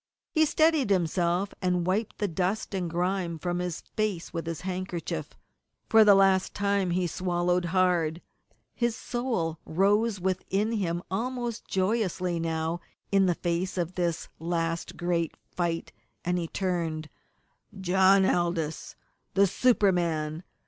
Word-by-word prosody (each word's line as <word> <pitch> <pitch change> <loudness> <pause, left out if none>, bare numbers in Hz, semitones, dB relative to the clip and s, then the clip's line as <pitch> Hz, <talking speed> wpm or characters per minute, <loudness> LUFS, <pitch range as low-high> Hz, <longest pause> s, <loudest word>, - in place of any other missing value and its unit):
He 315 -1 +4
steadied 310 -5 +3
himself, 180 +1 +1
and 180 -2 +1
wiped 200 +4 -1
the 205 - 0
dust 190 +5 -1
and 180 -3 -1
grime 175 0 -1
from 175 +2 -2
his 180 -2 -3
face 205 -6 -1
with 165 -1 -4
his 165 -2 -4
handkerchief. 180 - -4 0.5
For 220 0 +7
the 205 -2 +7
last 195 -1 +3
time 200 -2 +1
he 180 +1 +1
swallowed 175 0 0
hard. 175 -2 +1 0.5
His 235 -1 0
soul 230 -12 -2
rose 200 +4 +2
within 190 +3 0
him 175 -6 -1
almost 240 +2 -3
joyously 185 -3 0
now 165 +1 -1 0.3
in 195 -1 +4
the 175 - +2
face 175 +2 -2
of 175 0 -1
this 175 -3 -1
last 165 0 -2
great 170 -2 -1
fight, 170 -2 -2 0.3
and 180 0 +1
he 170 - -3
turned 165 -4 -2 0.7
John 190 +1 +5
Aldous, 170 -4 -1 0.4
the 200 +1 +6
super 205 0 +3
man. 160 -3 -1
180 Hz, 135 wpm, -28 LUFS, 170-195 Hz, 0.7 s, For